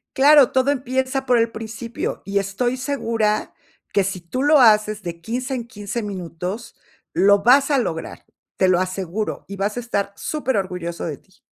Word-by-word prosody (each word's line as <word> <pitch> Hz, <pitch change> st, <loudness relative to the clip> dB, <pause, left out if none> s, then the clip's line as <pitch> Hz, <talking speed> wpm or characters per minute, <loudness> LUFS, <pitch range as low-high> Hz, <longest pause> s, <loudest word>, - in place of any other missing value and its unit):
Claro, 285 Hz, -1 st, +6 dB
todo 260 Hz, +2 st, +2 dB
empieza 260 Hz, 0 st, -1 dB
por 250 Hz, -2 st, +3 dB
el 230 Hz, 0 st, +2 dB
principio 225 Hz, +1 st, -5 dB
y 200 Hz, 0 st, 0 dB
estoy 200 Hz, +6 st, -1 dB
segura 230 Hz, -5 st, -1 dB, 0.4 s
que, 200 Hz, -, +3 dB
si 190 Hz, 0 st, -3 dB
tú 175 Hz, +10 st, -4 dB
lo 295 Hz, 0 st, +6 dB
haces 215 Hz, -3 st, +4 dB
de 170 Hz, -2 st, -6 dB
15 250 Hz, +7 st, -3 dB
en 240 Hz, -2 st, -4 dB
15 220 Hz, 0 st, -5 dB
minutos 185 Hz, +3 st, -6 dB, 0.4 s
lo 200 Hz, 0 st, +4 dB
vas 275 Hz, +5 st, +5 dB
a 280 Hz, -, +4 dB
lograr, 165 Hz, -9 st, -4 dB, 0.3 s
te 190 Hz, -, +3 dB
lo 180 Hz, -1 st, +4 dB
aseguro, 185 Hz, +2 st, -3 dB
y 200 Hz, -, -7 dB
vas 205 Hz, +3 st, -2 dB
a -, -, 0 dB
estar 200 Hz, -5 st, -2 dB
súper 280 Hz, -6 st, -2 dB
orgulloso 180 Hz, -3 st, -3 dB
de 150 Hz, -4 st, -4 dB
ti. 190 Hz, -, -28 dB
215 Hz, 175 wpm, -21 LUFS, 195-255 Hz, 0.4 s, Claro